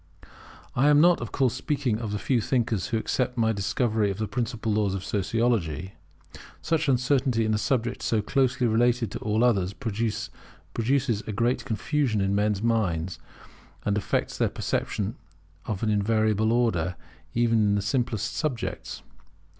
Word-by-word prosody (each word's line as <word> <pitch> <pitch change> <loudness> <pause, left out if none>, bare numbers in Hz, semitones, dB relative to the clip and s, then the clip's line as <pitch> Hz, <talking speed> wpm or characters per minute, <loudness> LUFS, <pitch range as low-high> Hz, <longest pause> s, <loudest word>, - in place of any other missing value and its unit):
I 135 +4 +3
am 145 0 +6
not, 175 -1 +5
of 120 - -5
course, 130 -4 +1
speaking 135 -8 -1
of 110 -3 -4
the 105 - -1
few 120 +3 +1
thinkers 115 -5 0
who 115 - 0
accept 125 +2 -1
my 110 -1 +2
discovery 105 +1 0
of 95 - -3
the 110 0 -2
principal 115 -2 -2
laws 105 -2 +1
of 95 - -4
Sociology. 95 - -1 0.7
Such 160 -2 0
uncertainty 125 -2 +2
in 110 - +1
a 105 - +1
subject 120 +1 -1
so 110 - +1
closely 125 +3 +1
related 120 +1 +2
to - - -5
all 110 +2 +1
others, 100 -6 +2
produces 115 +2 -2
great 120 +4 0
confusion 120 0 0
in 95 0 +1
men's 105 0 +1
minds, 90 -8 0 0.7
and 105 - +1
affects 105 - -1
their - - +3
perception 105 +5 -2 0.5
of 105 -2 -3
an 110 - +2
invariable 110 +1 +2
order, 95 -8 +1 0.4
even 115 -1 +3
in 105 -1 +3
the 100 - +1
simplest 110 0 -1
subjects. 135 -8 -3
110 Hz, 155 wpm, -26 LUFS, 105-125 Hz, 0.7 s, am